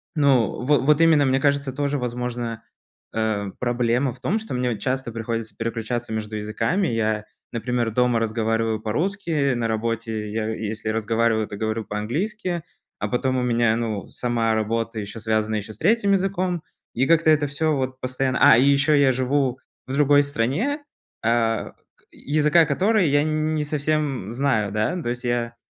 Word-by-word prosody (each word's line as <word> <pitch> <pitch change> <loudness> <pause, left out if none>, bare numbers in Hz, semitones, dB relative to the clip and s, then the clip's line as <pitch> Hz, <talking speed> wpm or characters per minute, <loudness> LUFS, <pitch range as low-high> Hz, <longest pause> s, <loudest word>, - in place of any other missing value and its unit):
ну, 135 -8 +2
во 145 +3 +3
вот 150 +3 +3
именно, 160 -3 +5
мне 135 0 +2
кажется, 140 -1 +1
тоже, 145 +1 -1
возможно, 120 -2 -4 0.5
э, 110 -3 -1
проблема 120 +1 +1
в 125 - -18
том, 190 - 0
что 220 - -6
мне 125 -2 -1
часто 130 +2 -2
приходится 115 -1 -4
переключаться 115 +1 -3
между 110 0 -4
языками. 115 - 0
Я, 110 -2 -1 0.3
например, 120 0 -1
дома 125 0 +2
разговариваю 115 0 0
по-русски, 155 - 0
на 120 -1 -1
работе 110 -1 -2
я 110 0 -2
если 110 0 -4
разговариваю, 110 0 +1
то 100 - -7
говорю 110 +1 -2
по-английски, 170 - -3 0.4
а 105 - -1
потом 130 +3 0
у 125 - 0
меня, 120 -2 +2
ну, 110 -3 -3
сама 115 -2 -1
работа 115 +1 -1
еще 105 +2 -6
связана 110 0 0
еще 105 0 -4
с - - -15
3 200 - +3
языком, 185 -3 0 0.3
и 130 +3 +1
как-то 165 -1 +4
это 150 -1 +4
всё 150 +2 0
вот 130 -1 -3
постоянно, 130 0 -1
а, - - +8
и 125 - +5
ещё 140 +2 +4
я 140 -2 +5
живу 130 0 0 0.3
в 130 - -4
другой 145 0 +5
стране, 145 - -1 0.4
а, 115 -1 +1 0.2
к - - -32
языка 150 +3 +3
которой 190 +6 +2
я 145 +1 +3
н 155 0 0
не 150 - 0
совсем 145 -6 -1
знаю, 120 -5 0
да, 110 +12 0
то 120 - -3
есть 120 +1 -4
я 120 -1 -1
125 Hz, 170 wpm, -23 LUFS, 115-145 Hz, 0.5 s, а